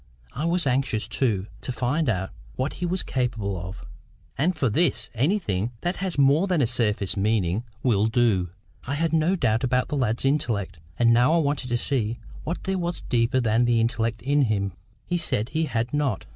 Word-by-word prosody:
I 145 +6 -3
was 170 0 +1
anxious, 125 -4 0
too, 110 -5 0 0.2
to - - -3
find 125 +5 0
out 95 -3 -1 0.2
what 130 +3 -2
he 175 - +1
was 185 +2 0
capable 115 -6 -1
of. 90 +3 -7 0.5
And 175 +6 +1
for 145 -4 +1
this, 150 +7 +1
anything 120 - 0
that 175 +2 -1
has 190 -4 -3
more 140 +7 +4
than 180 -4 +1
a 135 - +4
surface 105 -4 0
meaning 100 -1 +1 0.2
will 110 -4 +3
do. 110 -6 +2 0.4
I 140 - -1
had 165 +1 0
no 165 +4 +3
doubt 115 - +1
about 125 0 +1
the - - -1
lad's 120 -1 0
intellect, 110 - 0 0.2
and 115 -1 +5
now 125 +6 +4
I - - +4
wanted 145 -4 0
to 120 - +1
see 120 -3 -1 0.3
what 170 - -4
there 190 0 -1
was 175 0 -2
deeper 120 +2 +1
than 115 0 +2
the 120 -1 +3
intellect 115 0 -1
in 140 +1 +3
him. 100 -4 -1 0.3
He 175 0 -1
said 115 -8 0
he 160 0 0
had 115 -2 -2
not. 140 -9 0
125 Hz, 195 wpm, -25 LUFS, 110-150 Hz, 0.5 s, and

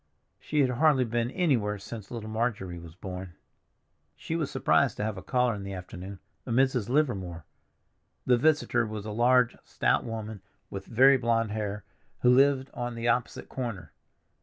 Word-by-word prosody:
She 150 -1 0
had 130 -2 +2
hardly 135 0 +3
been 120 +1 -1
anywhere 125 - +1
since 105 +1 -9
little 115 -3 -6
Marjorie 105 -6 -2
was 85 -1 -12
born. 90 -2 -7 0.8
She - - -4
was - - -1
surprised - - +2
to - - -2
have 110 -1 -2
a 95 - -7
caller 125 +1 +1
in 100 - -6
the 100 0 -6
afternoon, 95 +1 -8 0.3
a - - -10
Mrs. 125 -2 +2
Livermore. 95 - 0 0.8
The 125 - +5
visitor 130 -5 +2
was 105 -1 -6
a 110 - -4
large, 120 +2 +3
stout - - +1
woman 110 -3 -6 0.3
with 95 -1 -6
very 135 +4 +6
blond 115 -3 +1
hair, 105 -2 -3 0.4
who 125 - +5
lived 135 +1 +4
on 120 -1 -4
the 115 +1 -3
opposite 120 +1 -1
corner. 120 -7 -5
115 Hz, 165 wpm, -28 LUFS, 100-125 Hz, 0.8 s, very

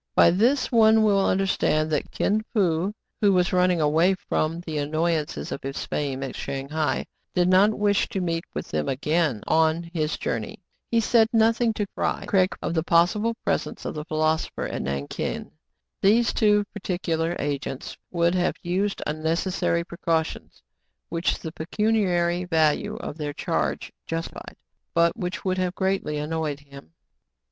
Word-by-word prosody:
By 170 - +7
this 240 +11 +2
one 220 -2 +5
will 200 -2 +3
understand 185 -5 +1
that 150 - -1
Kin 215 +2 0
Fo, 180 -2 +2 0.3
who 205 -2 +5
was 180 0 +2
running 180 -1 +3
away 160 +5 +3
from 165 -2 -2
the 160 -3 -4
annoyances 155 +1 -1
of - - -4
his 135 +1 -4
fame 135 -2 -2
at 135 - -5
Shang 135 0 -5
hai, 155 -1 -1 0.3
did 180 -1 +3
not 195 +4 +4
wish 205 -1 +2
to 200 - -2
meet 165 -2 -1
with - - -4
them 75 -1 -1
again 150 -3 0
on 160 +1 +2
his 155 -2 -1
journey. - - -4 0.3
He 230 -1 +3
said 225 0 +4
nothing 225 +1 +3
to 205 - -1
Fry - - -1
Craig 190 -3 +3
of - - -1
the 160 - +1
possible 180 +8 +2
presence - - -2
of - - -3
the 150 - -5
philoso 155 0 0
pher - - -2
at - - -2
Nankin. 70 +1 -4 0.5
These 230 +4 +4
too 210 -2 +3
particular 175 -4 -2
agents 140 -2 -4
would 170 0 +2
have 180 -1 +1
used 190 +3 -1
unnecessary 165 +2 0
precautions, 165 - -3 0.5
which 170 +1 0
the 160 - -7
pecuniary 180 -1 0
value 160 -4 +1
of 155 - -7
their 145 -1 -3
charge - - -2
justified, 165 0 -5 0.4
but 170 +2 +3
which 185 -2 -4
would 185 0 0
have 180 0 -1
greatly 190 -5 -1
annoyed 150 -1 -2
him. 140 - -14
170 Hz, 155 wpm, -25 LUFS, 155-195 Hz, 0.5 s, By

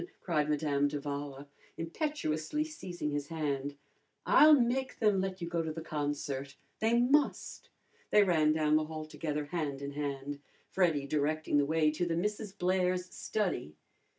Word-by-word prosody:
cried 150 -4 0
Madame 145 -1 +1
d'Avala, 145 -1 -5 0.3
impetuously 165 - -2
seizing 180 - -5
his 145 -1 -2
hand. 145 -3 -2 0.5
"I'll 305 -2 +7
make 255 +2 0
them 210 -4 +3
let 190 -1 -3
you - - -3
go 170 -1 -1
to 160 -1 -3
the 160 +1 -6
concert. 145 -3 -3 0.2
They 230 +2 +3
must!" 275 +4 +1 0.4
They 210 - +6
ran 160 -5 +3
down 155 -1 +3
the 155 - 0
hall 155 0 -6
together 150 -1 -3
hand 145 -3 -3
in 140 0 -5
hand, 140 0 -4 0.3
Freddy 165 -7 +2
directing 150 +1 +1
the 140 - +2
way 155 0 +3
to 175 +3 -1
the 165 -1 0
Misses 210 +2 -2
Blair's 180 -1 0
study. 185 - -2
155 Hz, 150 wpm, -32 LUFS, 145-185 Hz, 0.5 s, I'll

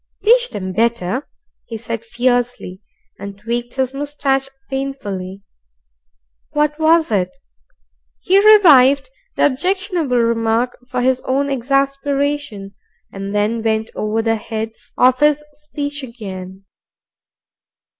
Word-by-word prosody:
"Teach 485 +2 +3
'em 185 -2 -4
better," 230 +2 0 0.4
he 225 - -6
said 230 0 -5
fiercely, 245 -5 -1 0.4
and 200 0 -8
tweaked 235 +3 -4
his 260 -1 -1
moustache 275 -1 -1 0.2
painfully. 200 -9 -5 1.1
What 300 +1 +1
was 320 -2 +3
it? 190 -4 +1 0.9
He 390 +2 +3
revived 295 - +6 0.2
the - - +3
objectionable 345 -1 0
remark 230 +1 +1
for 250 -1 -1
his 260 0 +2
own 275 +2 0
exasperation, 275 -4 -1 0.4
and 195 +1 -5
then 215 +3 0
went 220 0 -1
over 215 +1 -1
the 225 0 +1
heads 220 +1 -6
of 255 0 +4
his 300 0 +3
speech 290 -1 -6
again. 195 -6 -8
250 Hz, 110 wpm, -18 LUFS, 220-285 Hz, 1.1 s, revived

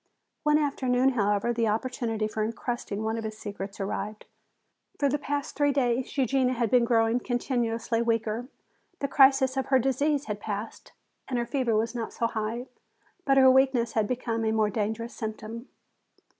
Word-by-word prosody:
One 300 0 +3
afternoon, 265 -3 +2
however, 210 -1 +1
the 230 -1 +1
opportunity 225 -1 -1
for 215 0 -2
entrusting 230 -2 -3
one 220 +1 -1
of - - -5
his 215 0 -5
secrets 200 -1 -7
arrived. 210 +2 -4 0.7
For 285 - +2
the 290 +2 0
past 285 0 -3
three 290 -1 +3
days 255 -1 0
Eugenia 260 0 +2
had 235 -3 0
been 245 -2 +5
growing 230 0 +3
continuously 240 -2 -1
weaker. 230 0 -1 0.5
The 280 - -2
crisis 270 -1 +4
of 265 - -1
her 265 - +4
disease 280 +3 +1
had 210 -1 -4
passed 210 +1 -6 0.4
and 255 - -2
her 240 - 0
fever 240 -2 0
was 225 +2 0
not 235 -2 -4
so 235 - -1
high. 230 +2 -2 0.6
But 275 -1 +3
her 260 -1 +8
weakness 260 -3 +3
had 220 -2 +1
become 235 -2 -2
a 220 - +1
more 215 -1 +2
dangerous 220 +3 -2
symptom. 220 +2 -6
235 Hz, 170 wpm, -27 LUFS, 220-260 Hz, 0.7 s, her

